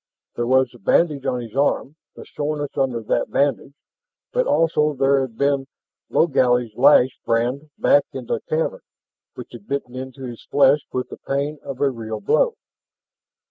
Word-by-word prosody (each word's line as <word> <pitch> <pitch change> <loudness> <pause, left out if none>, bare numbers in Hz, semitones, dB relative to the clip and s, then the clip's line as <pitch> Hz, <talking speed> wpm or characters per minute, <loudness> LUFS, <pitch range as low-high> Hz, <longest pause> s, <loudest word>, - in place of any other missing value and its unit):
There 120 0 -2
was 130 -1 +3
the 120 - -16
bandage 145 - +1
on 125 -1 -1
his 115 -1 -10
arm, 140 +1 0 0.2
the - - -11
soreness 145 -1 -4
under 125 -4 -1
that - - 0
bandage. 140 -1 0 0.6
But - - +1
also 150 - +2
there 135 +1 +3
had 125 -4 -5
been 140 -1 +1 0.4
Logally's 125 -7 +2
lash 130 0 +5
brand 125 +6 -1
back 145 - +4
in 130 -2 -7
the 115 - -1
cavern, 155 +1 -1 0.5
which - - -9
had 115 -4 -12
bitten 140 -3 -3
into 130 +1 -7
his 120 -3 -7
flesh 140 +1 +4
with 125 0 -3
the - - -9
pain 140 +2 -3
of 135 -2 -7
a 140 -1 +3
real 110 -3 -6
blow. 470 - +2
135 Hz, 165 wpm, -21 LUFS, 120-145 Hz, 0.6 s, lash